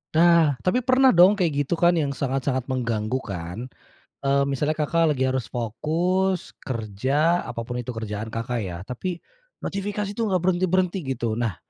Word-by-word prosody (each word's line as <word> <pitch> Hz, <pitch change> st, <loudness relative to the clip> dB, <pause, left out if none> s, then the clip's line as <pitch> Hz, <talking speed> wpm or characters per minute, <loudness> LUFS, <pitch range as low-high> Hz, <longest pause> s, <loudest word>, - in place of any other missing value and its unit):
Nah, 165 Hz, -4 st, +5 dB
tapi 185 Hz, +7 st, +2 dB
pernah 255 Hz, +1 st, +4 dB
dong, 180 Hz, +4 st, +6 dB
kayak 150 Hz, -7 st, 0 dB
gitu 170 Hz, -, +1 dB
kan, 175 Hz, +1 st, +4 dB
yang 140 Hz, -2 st, -1 dB
sangat-sangat 130 Hz, -1 st, -1 dB
mengganggu 115 Hz, -1 st, -1 dB
kan? 95 Hz, +3 st, -6 dB, 0.5 s
Eee, 140 Hz, 0 st, +2 dB
misalnya 145 Hz, +3 st, -1 dB
Kakak 155 Hz, -1 st, +2 dB
lagi 130 Hz, -, +1 dB
harus 130 Hz, -3 st, -1 dB
fokus, 170 Hz, -, -1 dB
kerja, 130 Hz, -, 0 dB
apa 115 Hz, -2 st, -5 dB
pun 125 Hz, +1 st, -4 dB
itu 120 Hz, -, -10 dB
kerjaan 110 Hz, 0 st, -4 dB
Kakak, 115 Hz, +1 st, -3 dB
ya, 90 Hz, -4 st, -5 dB
tapi, 170 Hz, -, -4 dB, 0.5 s
notifikasi 200 Hz, +1 st, -3 dB
tuh 225 Hz, 0 st, -1 dB
gak 185 Hz, -2 st, +1 dB
berhenti-berhenti 185 Hz, 0 st, +1 dB, 0.2 s
gitu. 115 Hz, -2 st, -2 dB
Nah, 110 Hz, -7 st, -1 dB
140 Hz, 160 wpm, -24 LUFS, 120-180 Hz, 0.5 s, dong